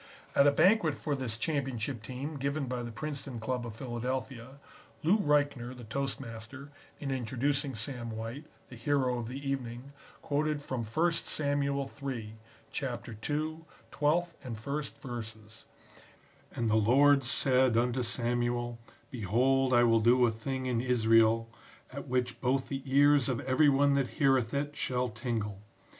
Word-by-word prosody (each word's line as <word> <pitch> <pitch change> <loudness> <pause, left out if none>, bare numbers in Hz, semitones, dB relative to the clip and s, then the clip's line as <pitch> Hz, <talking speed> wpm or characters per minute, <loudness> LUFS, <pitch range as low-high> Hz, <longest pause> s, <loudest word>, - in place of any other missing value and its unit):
At 140 - +6
a - - +7
banquet 170 +1 +4
for 150 - -2
this 130 -5 -1
championship 130 -3 -2
team 135 +6 -5
given 140 +1 -1
by 125 -1 -3
the 120 -1 -5
Princeton 140 -1 -5
Club 120 +1 -2
of 110 - -8
Philadelphia, 130 +1 -4 0.4
Lou 190 +8 +4
Reichner, 145 -7 +1
the 120 - -9
toastmaster, 130 +1 -5 0.3
in 140 -2 -3
introducing 135 +2 -1
Sam 120 +1 -5
White, 115 +6 -6 0.2
the 125 - -10
hero 125 0 +1
of 115 - -4
the 135 +3 -6
evening, 130 0 -4 0.3
quoted 150 +1 0
from 130 -4 -4
First 165 +9 0
Samuel 140 -2 0
III, 120 -6 -4 0.4
Chapter 125 -3 -4
ii, 150 +8 -2 0.3
12th 170 +4 +1
and 125 -3 -5
1st 140 +6 -4
verses 110 -3 -8 0.9
"And 115 - -2
the 110 0 +3
Lord 135 +6 +5
said 130 0 +3
unto 125 +2 +1
Samuel, 120 0 -1 0.3
behold 130 +4 +2
I 120 -1 +6
will 115 -1 +5
do 120 +3 +5
a 115 - +2
thing 130 +4 -4
in 120 -2 0
Israel, 115 -2 +4 0.5
at 140 +2 -6
which 125 -2 -1
both 130 +1 0
the 135 -1 -3
ears 145 -1 +5
of 125 -3 0
every 140 +3 +4
one 140 +1 +4
that 140 -2 +2
heareth 135 -5 +3
it 145 +1 -2
shall 125 -3 -1
tingle. 110 -3 -3
130 Hz, 150 wpm, -31 LUFS, 115-140 Hz, 0.9 s, a